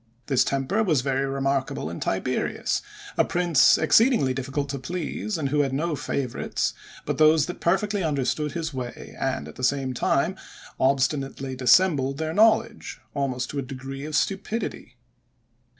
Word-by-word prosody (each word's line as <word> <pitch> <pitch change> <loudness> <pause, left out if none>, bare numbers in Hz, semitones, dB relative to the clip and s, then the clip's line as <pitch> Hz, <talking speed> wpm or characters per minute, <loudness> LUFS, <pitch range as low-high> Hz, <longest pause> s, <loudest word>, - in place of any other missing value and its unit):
This 135 -1 +3
temper 140 +11 0
was 160 -11 +2
very 135 +1 0
remarkable 135 - -1
in 85 - -6
Tiberius, - - -1 0.4
a - - +7
prince 175 -5 +4
exceedingly 220 - +4
difficult 135 +2 -3
to 140 0 -3
please, 175 +6 -3
and 145 -4 -1
who 150 +2 +1
had 135 -2 +1
no 155 +3 -1
favorites 135 -3 -2 0.3
but - - -2
those 155 -1 +5
that 180 - -7
perfectly 195 +3 +1
understood 150 -1 -1
his 165 -2 -3
way, 125 -2 -7
and, 70 - -2
at 75 - -12
the 130 - -7
same 130 0 +1
time, 120 - +1 0.4
obstinately 135 0 0
dissembled 135 +1 +3
their 160 +1 -2
knowledge, 220 +2 +2
almost 130 -3 -2
to 145 - -3
a - - 0
degree 135 +1 -7
of 155 0 -4
stupidity. 195 - -2
140 Hz, 150 wpm, -25 LUFS, 135-165 Hz, 0.4 s, a